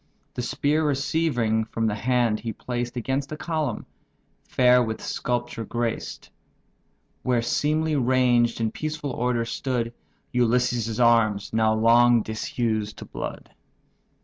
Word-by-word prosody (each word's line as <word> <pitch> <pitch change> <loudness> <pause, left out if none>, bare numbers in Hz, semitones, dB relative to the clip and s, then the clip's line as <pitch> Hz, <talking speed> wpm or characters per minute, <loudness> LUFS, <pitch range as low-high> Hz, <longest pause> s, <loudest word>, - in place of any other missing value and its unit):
The 125 - -3
spear 150 +5 0
receiving 140 -6 +1
from 115 0 -2
the 110 - +1
hand, 115 -1 +1
he 115 -1 -4
placed 120 +2 -4
Against 135 +4 -2
a 155 - -4
column, 160 -2 -2 0.6
fair 125 0 +4
with 110 -2 -2
sculpture 120 -1 -3
graced; 120 +1 -4 0.9
Where 125 -2 +1
seemly 155 +5 +1
ranged 125 -3 +2
in 110 -1 0
peaceful 155 -2 -4
order 120 -1 0
stood 120 0 -2 0.4
Ulysses' 120 -2 +1
arms 115 -4 +3
now 110 -1 +3
long 120 +1 +5
disused 110 -1 -2
to - - -8
blood. - - -7
120 Hz, 120 wpm, -25 LUFS, 115-130 Hz, 0.9 s, long